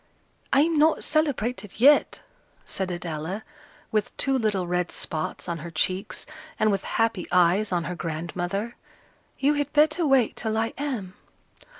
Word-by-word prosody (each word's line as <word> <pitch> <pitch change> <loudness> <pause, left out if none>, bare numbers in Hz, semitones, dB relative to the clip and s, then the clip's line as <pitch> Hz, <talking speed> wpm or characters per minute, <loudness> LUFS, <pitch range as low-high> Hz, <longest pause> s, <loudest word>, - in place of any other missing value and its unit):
"I'm 305 +3 +4
not 315 +1 +4
celebrated 250 - -1
yet," 285 +5 +5 0.4
said 190 -2 -2
Adela, 175 +3 -4 0.5
with 215 -2 -1
two 270 -1 +1
little 210 -7 0
red 180 0 -1
spots 155 -2 -3
on 170 -1 -3
her 170 +2 -7
cheeks, 185 +5 -1 0.3
and 215 0 +3
with 195 -1 -1
happy 225 -5 +1
eyes 180 +4 +3
on 175 -2 +1
her 180 - -4
grandmother. 175 +6 -4 0.6
"You 285 +2 +3
had 290 -1 -1
better 305 +3 +4
wait 265 -5 +3
till 220 -1 -2
I 225 +1 0
am." 245 -10 -4
210 Hz, 140 wpm, -25 LUFS, 180-270 Hz, 0.6 s, yet